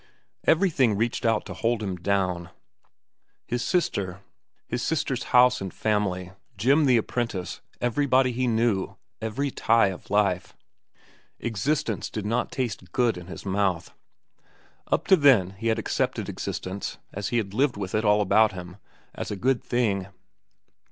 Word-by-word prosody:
Everything 150 - +3
reached 115 +1 0
out 110 -2 +1
to - - -6
hold 115 -1 -1
him 95 -3 -2
down—his 90 +5 -5
sister, 100 - -1 0.5
his 120 +1 -2
sister's 135 -5 -1
house 125 -1 +5
and 95 -1 -4
family, 95 -4 -1 0.3
Jim 140 +6 +4
the 125 -3 +5
apprentice, 115 -5 -3 0.2
everybody 130 +1 +2
he 125 +1 -1
knew, 110 -4 +1 0.3
every 120 +6 -2
tie 115 -5 +3
of 95 - -9
life. 100 -3 +1 0.8
Existence 120 +1 -1
did 105 -2 -5
not 115 +3 -1
taste 105 -9 -4
good 120 +2 +2
in 90 -1 -9
his 95 - -9
mouth. 95 -3 0 0.9
Up - - 0
to 190 - +7
then 130 - +5
he 100 +4 -5
had 110 0 +2
accepted 115 - -1
existence, 95 +2 -5 0.2
as 100 0 -3
he 120 - 0
had 100 -4 -2
lived 130 0 +1
it - - -6
with 95 -1 -4
all 105 -1 +3
about 105 +2 +4
him, 90 0 -8 0.4
as - - -5
a 105 - -3
good 125 +5 +1
thing. 105 -6 0
110 Hz, 145 wpm, -26 LUFS, 95-125 Hz, 0.9 s, to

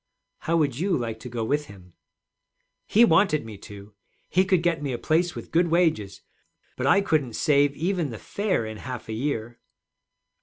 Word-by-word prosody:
'How 165 +1 0
would 140 -5 0
you 185 0 +1
like 115 -3 -4
to 125 - -8
go 115 -1 -3
with 145 +6 -1
him?' 90 -3 -15 0.9
'He 230 +3 +6
wanted 160 - +3
me 110 -2 -8
to. 100 +1 -12 0.4
He 185 +1 +3
could 185 -3 +2
get 170 -3 +1
me 140 -3 -2
a - - -2
place 170 +5 0
with - - -9
good 170 +1 +3
wages. 160 - +1 0.5
But 130 - -2
I 200 +7 +5
couldn't 150 - 0
save 145 +1 +2
even 170 -1 -1
the 115 - -7
fare 200 - -2
in 110 0 -6
half 125 0 -7
a - - -3
year.' 120 -1 -3
145 Hz, 185 wpm, -25 LUFS, 115-170 Hz, 0.9 s, He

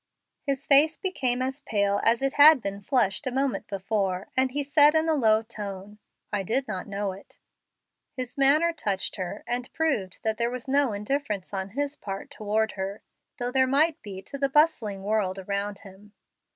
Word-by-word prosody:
His 275 0 -1
face 310 +2 +5
became 255 -10 -1
as 265 +2 -4
pale 200 -3 0
as 230 +3 +3
it 275 - 0
had 295 0 +8
been 200 -2 -5
flushed 240 +1 +1
a - - -1
moment 270 +1 -1
before, 195 -1 -2
and 260 0 +2
he 285 +3 -2
said, 290 +1 +5
in 315 +1 +2
a 320 - +3
low 220 -6 +3
tone, 205 -2 -8 0.3
"I 205 - +1
did 255 +8 -1
not 185 - -5
know 200 -1 -2
it." 190 +1 -14 0.8
His 255 -1 -5
manner 300 +5 +4
touched 205 -10 -2
her, 185 +2 -5
and 245 +1 -3
proved 250 - -1
that 220 0 -1
there 235 0 +1
was 250 0 -6
no 275 -2 +2
indifference 210 -2 -3
on 190 0 -3
his 285 0 -1
part 195 +7 -7
toward 220 -4 -1
her, 195 +1 -5 0.3
though 245 0 -3
there 260 0 +3
might 300 +4 +2
be 195 -2 -8
to 280 +7 -8
the 275 0 +1
bustling 245 -10 +2
world 200 -2 0
around 200 +1 -3
him. 200 +2 -15
225 Hz, 185 wpm, -26 LUFS, 200-275 Hz, 0.8 s, had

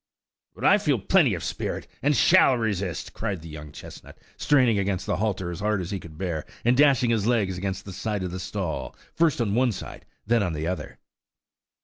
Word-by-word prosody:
"But - - -10
I - - +6
feel - - +1
plenty - - +3
of - - -6
spirit, - - -3 0.2
and 145 +1 +2
shall 130 +2 +5
resist," 100 -6 -3
cried 100 -6 -3
the 80 - -10
young 75 -1 -9
chestnut, - - -12 0.2
straining 125 -7 +3
against 95 -1 -1
the - - -1
halter 95 -4 -1
as 85 - -6
hard 105 0 0
as 90 -2 -5
he 100 - -2
could 80 -3 -12
bear, 85 -5 -3 0.2
and 120 +1 +4
dashing 135 -4 +4
his 110 -2 +1
legs 105 -6 +1
against 95 +2 -4
the 95 - -8
sides 105 -1 -3
of 90 - -4
the 95 - -5
stall, 95 -4 -4 0.2
first 165 -5 +2
on 110 -4 0
one 125 +2 +3
side, 95 - -9 0.2
then 115 +2 +2
on 90 -4 -1
the 75 +1 -3
other. 85 -4 -4
100 Hz, 210 wpm, -25 LUFS, 90-115 Hz, 0.2 s, I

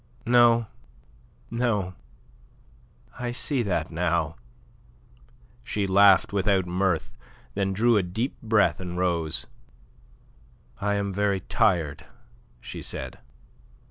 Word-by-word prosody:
"No, 120 -1 +5 0.9
no. 110 -6 0 1.3
I 120 0 -2
see 130 +2 0
that 90 -8 -1
now." 80 -1 0 1.3
She 105 -3 -2
laughed 100 0 +5
without 100 -2 +2
mirth, 90 -1 0 0.4
then 100 -1 -1
drew 115 +4 +3
a - - +4
deep 105 +9 -3
breath 110 -3 +2
and 90 -1 -5
rose. 85 -4 -1 1.3
"I 100 0 0
am 100 -1 -2
very 100 -1 0
tired," 80 -5 0 0.5
she - - -8
said. - - -5
100 Hz, 100 wpm, -26 LUFS, 90-110 Hz, 1.3 s, No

